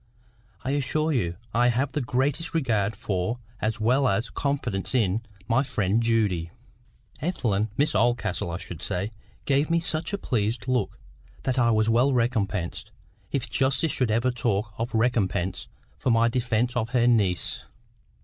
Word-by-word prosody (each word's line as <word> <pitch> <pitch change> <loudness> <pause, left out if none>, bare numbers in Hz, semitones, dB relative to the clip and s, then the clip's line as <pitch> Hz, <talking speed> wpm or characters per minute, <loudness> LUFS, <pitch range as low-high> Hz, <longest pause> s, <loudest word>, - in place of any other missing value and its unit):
I 130 - -1
assure 155 +3 0
you 90 - 0 0.2
I 120 +2 +4
have 130 +3 +1
the 150 - -1
greatest 135 +7 0
regard 110 -8 +1
for, 100 +1 -2 0.2
as 110 +1 -1
well 125 +5 +3
as 105 +3 0
confidence 130 -7 -1
in, 110 -3 +2 0.3
my 125 +5 +3
friend 110 -5 0
Judy." 105 -8 +1 0.7
Ethelwyn—Miss 115 - 0
Oldcastle, 110 -7 +1
I 85 - -3
should 85 -3 -8
say—gave 110 - -2
me 170 0 +3
such 165 +1 -2
a 200 - -1
pleased 110 - -1
look 125 -5 0 0.5
that 130 -1 0
I 120 -1 +4
was 110 -1 +3
well 120 +5 +3
recompensed—if 110 +2 -2
justice 135 +3 +1
should 125 -3 0
ever 115 +4 +2
talk 110 -4 -1
of 115 +1 -2
recompense—for 100 -1 -1
my 115 0 +4
defence 120 0 0
of 115 -2 0
her 120 -1 +2
niece. 100 -8 +1
115 Hz, 140 wpm, -26 LUFS, 105-130 Hz, 0.7 s, I